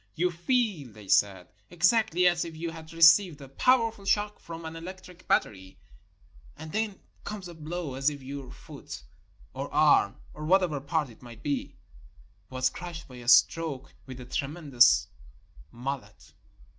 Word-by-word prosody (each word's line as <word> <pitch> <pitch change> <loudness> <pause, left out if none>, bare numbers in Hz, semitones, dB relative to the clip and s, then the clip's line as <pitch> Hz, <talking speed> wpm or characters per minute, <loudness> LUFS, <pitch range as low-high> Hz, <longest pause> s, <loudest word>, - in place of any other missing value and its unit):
"You 180 +2 +1
feel," 175 - -1
they 105 -1 -14
said, 95 -2 +2 0.2
"exactly 185 +2 +2
as 175 -1 +3
if 165 -1 -8
you 165 +1 -4
had 160 -1 -11
received 165 0 +6
a 140 - -10
powerful 225 - +2
shock 205 +1 0
from 165 0 -9
an 160 0 -6
electric 180 +1 -10
battery, 95 -2 -1 0.8
and 160 0 -9
then 215 -1 -2 0.2
comes 205 -3 -6
a 175 - -9
blow 160 -1 -5
as 135 +2 +1
if 145 -2 -9
your 135 -1 -7
foot" - - -10 0.5
(or - - -5
arm, - - +4 0.2
or 150 - -8
whatever 170 -3 +2
part 150 -2 -1
it 110 - -18
might 120 -2 -13
be) 145 -2 -3 0.7
"was 130 0 0
crushed 175 +1 -8
by 125 - -12
a 120 -1 -11
stroke 140 0 +3
with 130 -1 -9
a 125 - -9
tremen 145 +4 -5
dous 120 - +6 0.6
mallet." 135 +3 -7
160 Hz, 155 wpm, -28 LUFS, 130-180 Hz, 0.8 s, received